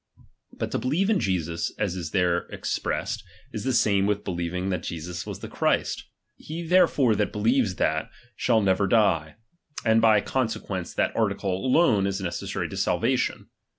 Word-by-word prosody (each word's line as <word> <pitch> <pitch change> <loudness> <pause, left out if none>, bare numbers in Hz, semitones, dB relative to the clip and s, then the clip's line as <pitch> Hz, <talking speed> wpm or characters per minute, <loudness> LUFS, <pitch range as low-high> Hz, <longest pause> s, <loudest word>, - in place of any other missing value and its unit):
But - - -4
to - - -1
believe 170 +11 +1
in 210 - +3
Jesus, 85 -3 -1
as 100 -4 -1
is 85 -4 -4
there 90 0 +1
expressed, - - -3 0.3
is 105 - -4
the 130 - +1
same 100 -5 +3
with 105 0 0
believing 90 0 -3
that 90 -3 -1
Jesus 85 +1 -5
was - - -6
the - - -6
Christ. - - 0 0.3
He 165 +2 -6
therefore 160 -9 +4
that 105 0 0
believes 110 -1 +1
that, 80 -1 0 0.3
shall 115 -3 +2
never 95 +1 +2
die; 90 -8 +2 0.5
and 110 0 +4
by 110 -2 +6
conse 115 -3 -1
quence, 90 -5 -5
that - - 0
article 95 - 0
alone 105 - +3
is 100 0 -2
necessary 90 -3 -3
to - - -7
salvation. - - 0
100 Hz, 165 wpm, -26 LUFS, 90-115 Hz, 0.5 s, by